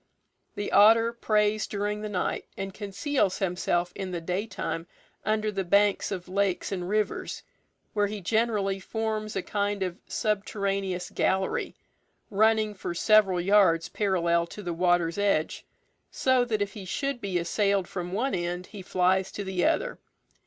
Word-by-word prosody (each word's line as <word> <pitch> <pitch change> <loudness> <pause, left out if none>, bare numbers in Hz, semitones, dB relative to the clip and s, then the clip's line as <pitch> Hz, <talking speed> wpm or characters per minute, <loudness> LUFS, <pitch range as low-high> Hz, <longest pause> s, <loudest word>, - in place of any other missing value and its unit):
The 205 - -3
otter 225 +3 +6
preys 215 -2 +1
during 210 +1 -2
the 215 - -4
night, 185 -3 -2
and 195 0 -4
conceals 200 +1 -1
himself 180 -1 0
in 190 - -5
the 175 -2 -3
daytime 180 -1 -3 0.4
under 215 0 0
the 195 -1 -2
banks 200 +3 +2
of 185 -2 -4
lakes 190 -1 0
and 180 -2 -3
rivers, 215 0 -1 0.5
where 205 -1 +2
he 210 +1 -5
generally 205 -1 0
forms 215 +1 -3
a 195 - -1
kind 205 -1 -1
of 180 0 -4
subterraneous 195 -3 -1
gallery, 190 0 0 0.6
running 215 +1 +3
for 180 -3 -5
several 200 -2 +4
yards 180 -3 +4
parallel 170 -4 +1
to 210 - -9
the 175 -2 -3
water's 175 0 +1
edge, 200 -6 0 0.4
so 260 -2 +2
that 215 -4 0
if 200 - -7
he 205 - -8
should 275 +6 -2
be 195 -3 -1
assailed 195 +2 +1
from 180 -1 -5
one 245 +8 -1
end, 175 0 -2
he 205 0 -10
flies 185 +1 +1
to 205 - -4
the 190 -2 -1
other. - - 0
200 Hz, 150 wpm, -27 LUFS, 180-215 Hz, 0.6 s, otter